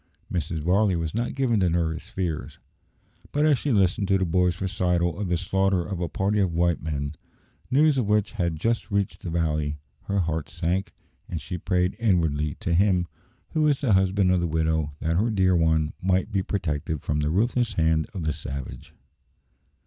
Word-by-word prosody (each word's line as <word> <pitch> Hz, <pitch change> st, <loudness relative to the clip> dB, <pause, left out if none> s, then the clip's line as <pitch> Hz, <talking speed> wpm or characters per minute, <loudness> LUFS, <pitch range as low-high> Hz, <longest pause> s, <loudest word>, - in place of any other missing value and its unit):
Mrs. 80 Hz, -2 st, -2 dB
Varley 95 Hz, +3 st, +3 dB
was 80 Hz, -2 st, -2 dB
not 120 Hz, +3 st, -2 dB
given 125 Hz, -5 st, +2 dB
to 90 Hz, -2 st, +3 dB
nervous 80 Hz, -1 st, -1 dB
fears, 85 Hz, -5 st, -4 dB, 0.7 s
but 150 Hz, +1 st, +2 dB
as 145 Hz, -5 st, +4 dB
she 145 Hz, -, -1 dB
listened 100 Hz, -2 st, +2 dB
to 95 Hz, 0 st, +3 dB
the 95 Hz, -, 0 dB
boy's 90 Hz, +1 st, +1 dB
recital 90 Hz, -2 st, 0 dB
of 105 Hz, -, -2 dB
the 90 Hz, 0 st, +1 dB
slaughter 95 Hz, 0 st, +1 dB
of 95 Hz, -4 st, -4 dB
a 85 Hz, -, -1 dB
party 100 Hz, +5 st, 0 dB
of 90 Hz, -4 st, +1 dB
white 85 Hz, 0 st, +1 dB
men, 70 Hz, -2 st, -3 dB, 0.6 s
news 145 Hz, +1 st, +4 dB
of 115 Hz, -, 0 dB
which 105 Hz, -1 st, +2 dB
had 85 Hz, -2 st, -1 dB
just 115 Hz, +6 st, 0 dB
reached 100 Hz, -2 st, -1 dB
the 90 Hz, -, -5 dB
valley, 75 Hz, -3 st, -1 dB, 0.3 s
her 100 Hz, -1 st, 0 dB
heart 80 Hz, -2 st, -2 dB
sank, 90 Hz, +4 st, -2 dB, 0.4 s
and 85 Hz, -, -3 dB
she 90 Hz, +5 st, -6 dB
prayed 90 Hz, +1 st, 0 dB
inwardly 80 Hz, -9 st, +1 dB
to 85 Hz, -, -2 dB
Him 90 Hz, -1 st, +3 dB, 0.4 s
who 155 Hz, -2 st, +2 dB
is 145 Hz, -3 st, +1 dB
the 125 Hz, -7 st, +2 dB
husband 95 Hz, 0 st, +3 dB
of 90 Hz, -, +3 dB
the 85 Hz, -, 0 dB
widow 80 Hz, -1 st, 0 dB
that 80 Hz, +1 st, 0 dB
her 110 Hz, +5 st, +2 dB
dear 95 Hz, -4 st, +3 dB
one 80 Hz, -2 st, +2 dB
might 95 Hz, 0 st, +1 dB
be 95 Hz, -, +1 dB
protected 80 Hz, -6 st, -2 dB
from 75 Hz, 0 st, -1 dB
the 75 Hz, 0 st, 0 dB
ruthless 120 Hz, +6 st, +1 dB
hand 80 Hz, -3 st, +2 dB
of 90 Hz, -, -3 dB
the 80 Hz, -1 st, 0 dB
savage. 70 Hz, -4 st, -7 dB
90 Hz, 190 wpm, -25 LUFS, 80-100 Hz, 0.7 s, as